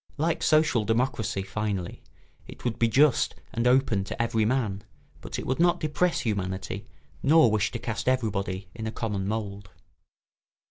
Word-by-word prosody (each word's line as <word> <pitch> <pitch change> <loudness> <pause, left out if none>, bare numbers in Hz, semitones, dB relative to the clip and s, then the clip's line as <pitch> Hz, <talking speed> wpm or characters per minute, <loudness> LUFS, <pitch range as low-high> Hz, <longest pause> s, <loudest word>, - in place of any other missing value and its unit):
Like 160 +3 0
social 155 -7 +3
democracy, 115 -2 0
finally, 95 -2 -3 0.5
it - - -12
would 120 -3 -1
be 115 - +4
just 135 +5 +3 0.2
and 115 +1 +1
open 125 -6 +3
to - - -6
every 115 -2 +1
man, 110 -5 0 0.4
but - - -6
it - - -5
would 130 - -1
not 175 0 +4
depress 165 +3 0
humanity 95 -2 -3 0.3
nor 155 -5 +5
wish 105 -1 +1
to 120 - -4
cast 115 -1 -4
everybody 100 -6 -1
in 110 -1 -5
a - - -2
common 105 -4 -3
mould. 100 -2 -4
115 Hz, 155 wpm, -27 LUFS, 100-130 Hz, 0.5 s, nor